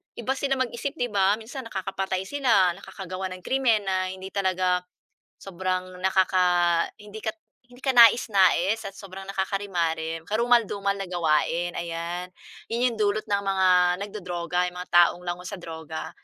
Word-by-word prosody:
iba 240 +3 -3
sila 270 0 0
mag-isip 260 +3 -3
‘di 245 -6 -2
ba. 200 0 +3
Minsan 230 +3 -8
nakakapatay 190 -1 -3
sila, 225 -7 +3
nakakagawa 190 0 -6
ng 185 - -14
krimen 245 -6 +2
na 185 -1 0
hindi 190 +1 -7
talaga 185 -2 +1 0.6
sobrang 185 -1 -3
nakaka 180 -2 +3 0.2
hindi 210 +1 -9
ka 220 0 -3 0.4
hindi 245 - -16
ka 265 - +2
nais-nais 220 -3 +5
at 195 -1 -8
sobrang 195 -1 -9
nakakarimarim, 170 -5 -2
karumal-dumal 220 -3 +2
na 195 - -4
gawain, 170 0 +1
ayan. 170 +1 -4 0.4
'Yon 240 +2 +1
'yong 230 - -6
dulot 210 0 +1
ng 200 0 +1
mga 190 -1 +2 0.4
nagdodroga, 180 -3 -2
'yong 180 - -6
mga 180 0 -8
taong 175 0 +5
lango 180 0 -5
sa 200 - -5
droga. 160 -3 -7
190 Hz, 150 wpm, -25 LUFS, 180-215 Hz, 0.6 s, nais-nais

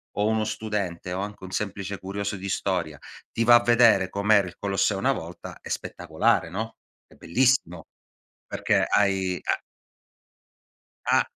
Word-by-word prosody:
o 105 +2 +1
uno 110 0 +1
studente 100 -5 -3
o 95 - -2
anche 105 -1 -7
un 95 - -7
semplice 100 0 -3
curioso 100 +2 -4
di 95 0 -6
storia 90 -6 -2 0.3
ti 115 - 0
va 120 +1 +7
a 120 - +5
vedere 115 -6 +5
com'era 100 0 +3
il 85 - -10
Colosseo 100 0 0
una 130 +6 +2
volta, 85 -9 -7
è - - -10
spettacolare, - - 0
no, 110 +6 -5 0.3
è - - -20
bellissimo, 90 -4 +1 0.6
perché - - +1
hai 95 -3 +1
ha - - 0 1.5
ha - - +4
100 Hz, 150 wpm, -25 LUFS, 95-110 Hz, 1.5 s, va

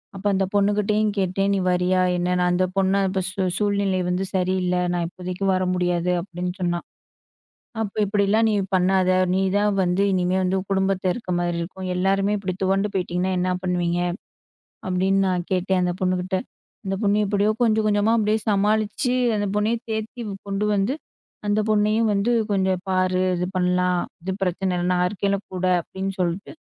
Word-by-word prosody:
அப்ப 195 +1 -9
அந்த 195 0 +1
பொண்ணுகிட்டயும் 210 +1 +2
கேட்டேன், 195 +1 0
நீ 195 - +1
வரியா 180 +1 +2 0.2
என்னன்னு 180 0 +1
அந்த 180 +1 +2
பொண்ணு, 195 0 +2
அப்ப 190 0 -1
சூ 190 +1 -4 0.2
“சூழ்நிலை 200 -2 +1
வந்து 180 +2 0
சரியில்ல, 185 0 +1 0.2
நான் 175 -1 0
இப்போதைக்கு 185 +2 -5
வர 185 0 +1
முடியாது” 180 0 0
அப்டின்னு 180 -1 -5
சொன்னா. 175 -1 0 1.0
அப்போ 210 -1 -4
“இப்படிலாம் 205 +2 +2
நீ - - +1 0.2
பண்ணாத, 185 0 +2 0.2
நீ 190 - +2 0.2
தான் 205 0 +2
வந்து 180 +2 +1
இனிமே 185 0 +1
வந்து 185 +1 +1
உன் 190 - -9
குடும்பத்தில 190 -1 +1
இருக்க 205 -5 -6
மாரி 175 -1 -1
இருக்கும். 185 +2 -6
எல்லாருமே 195 +2 +1
இப்படி 185 -2 -3
துவண்டு 195 +2 +1
போயிட்டிங்கன்னா 185 0 -1
என்னா 180 0 0
பண்ணுவீங்க?” 175 -1 0 0.9
அப்டின்னு 190 +1 +2
நான் 180 -1 -2
கேட்டேன் 185 0 +1
அந்த 175 0 0
பொண்ணுகிட்ட. 185 0 0 0.5
அந்த 195 0 -1
பொண்ணு 205 0 +3
எப்படியோ 205 +1 +2
கொஞ்சம் 220 -2 +3
கொஞ்சமா 205 +1 +2
அப்டியே 215 0 +1
சமாளிச்சு, 210 +4 +1 0.2
அந்த 205 0 0
பொண்ணையே 215 +3 +1
தேத்தி 220 +3 -4 0.3
கொண்டு 200 +1 -1
வந்து, 205 +6 +1 0.5
அந்த 205 +1 +2
பொண்ணையும் 215 +1 +2
வந்து 200 +4 +1 0.2
"கொஞ்சம் 190 -2 +1
பாரு, 185 0 +1 0.2
இது 180 +1 -1
பண்ணலாம், 180 0 +2 0.2
இது 190 +1 -3
பிரச்சனை 185 +1 -1
இல்ல, 175 - -1
நான் 180 0 +2
இருக்கேன்ல 200 -1 -1 0.2
கூட” 185 0 -1 0.2
அப்டின்னு 195 +2 -5
சொல்லிட்டு 175 +2 -2
190 Hz, 160 wpm, -23 LUFS, 180-205 Hz, 1.0 s, பொண்ணு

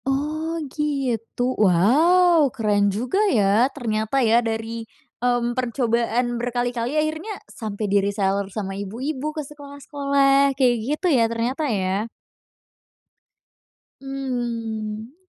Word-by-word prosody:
Oh, 310 +4 -1 0.2
gitu? 255 -4 -1
Wow! 300 - +4
Keren 205 -3 +2
juga 245 - -1
ya, 215 - +3
ternyata 220 -3 -2
ya, 230 +2 +4
dari, 225 0 -3 0.4
mmm, 245 -1 +1
percobaan 240 -1 0
berkali-kali 245 +2 -2
akhirnya 315 +7 -2
sampai 215 -2 -5
di 200 0 +2
reseller 200 -1 -1
sama 195 -1 -4
ibu-ibu 260 +9 -4
ke 305 - -3
sekolah-sekolah, 280 -1 +1
kayak 250 -3 +4
gitu 305 +5 0
ya, 240 -3 +4
ternyata, 245 +6 -1
ya? 200 +1 -1 1.9
Mmm. 235 -4 -4
245 Hz, 100 wpm, -23 LUFS, 220-280 Hz, 1.9 s, Wow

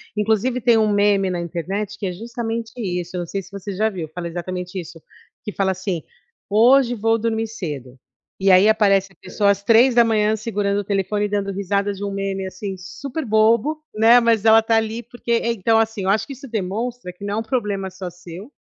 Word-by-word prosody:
inclusive 220 +4 0
tem 235 -1 +4
um 215 -1 +2
meme 200 -2 +2
na 175 - -2
internet 190 +5 -4
que 200 - -5
é 185 - -1
justamente 230 +2 -5
isso, 180 -4 -3
eu - - -2
não 175 - -6
sei 195 +3 -3
se 190 - -15
você 200 0 -6
já 215 +3 +1
viu, 180 -6 -6
fala 175 -1 -5
exatamente 180 +2 -5
isso, 165 -1 -10 0.4
que 210 - -5
fala 195 -1 0
assim: 185 -3 -3 0.4
"Hoje 245 +4 +5
vou 225 0 +1
dormir 225 0 -1
cedo". 145 - -7 0.4
E 195 0 +4
aí 185 +3 +6
aparece 195 -3 +3
a - - -29
pessoa 200 +2 0
às 200 0 +1
3 225 -2 +4
segurando 205 -2 -1
o - - -3
telefone 205 +1 -1
dando 200 -1 -2
risada 200 +1 -1
de 200 0 -7
um 200 - -3
meme, 195 -1 -3
assim, 190 +1 -6
super 270 - -6
bobo, 230 +7 +2
né, 225 +3 +6
mas 230 -3 +2
ela 225 0 +7
tá 225 0 +1
ali 225 +1 0
porque 240 0 -7
é 235 0 +2
então 225 +1 +2
assim, 220 -3 -1
eu 190 - 0
acho 215 - 0
que 280 - -6
isso 270 +1 -11
demonstra 220 0 -4
que 190 +3 -10
não 200 - -3
é 210 - -1
um - - 0
problema 210 -5 -2
só 185 -1 -7
seu, 180 - -11
205 Hz, 210 wpm, -21 LUFS, 190-225 Hz, 0.4 s, ela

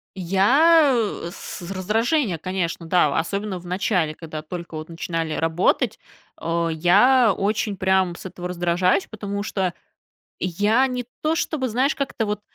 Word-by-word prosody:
Я, 270 - +4
э, 210 -6 -2
с - - -8
раздражение, 215 - 0
конечно, 180 -2 -3
да, 175 -2 +4
а, - - +3
особенно 200 +1 -3
в 175 - -15
начале, 180 -4 0
когда 155 -2 -7
только 170 +1 -7
вот 155 +1 -7
начинали 165 -1 -3
работать, 175 +8 +1 0.4
а, 165 0 -1
я 205 +8 +4
очень 205 0 -1
прям 190 -2 +2
с - - -11
этого 180 -1 -6
раздражаюсь, 180 +2 +1
потому 200 -2 -5
что 190 -4 -1 0.7
я 205 +8 +2
не 250 -1 -3 0.2
то, 310 +1 +2
чтобы, 275 -6 -1
знаешь, 260 +6 +1
как-то 270 -6 -2
вот, 210 0 -2
190 Hz, 150 wpm, -23 LUFS, 170-225 Hz, 0.7 s, Я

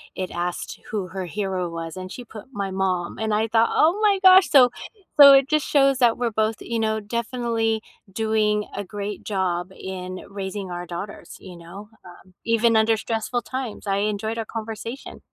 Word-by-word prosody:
it 185 -1 -4
asked 175 0 -4
who 205 -4 -3
her 190 0 -5
hero 185 -1 -3
was, 165 0 -6
and 185 0 -6
she 245 - -8
put 220 -1 -11
"My 195 -1 -3
mom," 185 -2 -1
and 220 -1 -1
I 220 +1 +1
thought, 225 +1 +3
"Oh 340 +7 +3
my 405 -2 +3
gosh." 375 0 +8
So 265 -5 +7 0.5
so 280 -1 +11
it 270 0 +5
just 305 -1 +1
shows 275 -2 +3
that 235 -2 +4
we're 240 -2 -1
both, 220 +1 0
you 230 -1 -3
know, 220 0 0
definitely 230 0 -1 0.3
doing 215 0 0
a 205 - -3
great 205 +1 -6
job 185 -2 -2
in 185 -1 -6
raising 195 -1 -5
our 175 0 -5
daughters, 180 +4 -8
you 180 -3 -11
know, 190 +5 -11 0.2
um, 180 +1 -15
even 230 0 +3
under 220 +1 +3
stressful 225 +2 -2
times. 255 -5 -6
I 195 -1 0
enjoyed 215 +2 -2
our 225 - -3
conversation. 225 +3 -7
215 Hz, 185 wpm, -23 LUFS, 190-230 Hz, 0.5 s, so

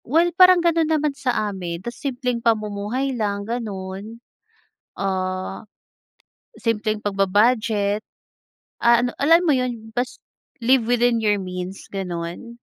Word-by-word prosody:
Well, 335 +6 +2
parang 365 -1 +6
ganun 330 -2 +3
naman 305 -2 +1
sa 275 -2 -3 0.2
amin, 175 -1 -6
ta's 240 - -4
simpleng 250 -4 -2
pamumuhay 220 +4 0
lang 205 -4 -2
ganun. 210 -2 -5 0.8
Ah, 185 +1 -3 0.9
simpleng 215 - -1
pagba-budget. 205 +1 +1 0.8
Ah, 235 0 +5
ano, 245 - 0
alam 330 +4 +6
mo 310 - +4
yun? 240 -3 -3
Bas 245 +1 -2 0.4
live 245 0 +3
within 245 -1 +3
your 210 -1 +2
means, 180 +1 -6
gano'n. 180 +4 -5
225 Hz, 120 wpm, -22 LUFS, 195-255 Hz, 0.9 s, parang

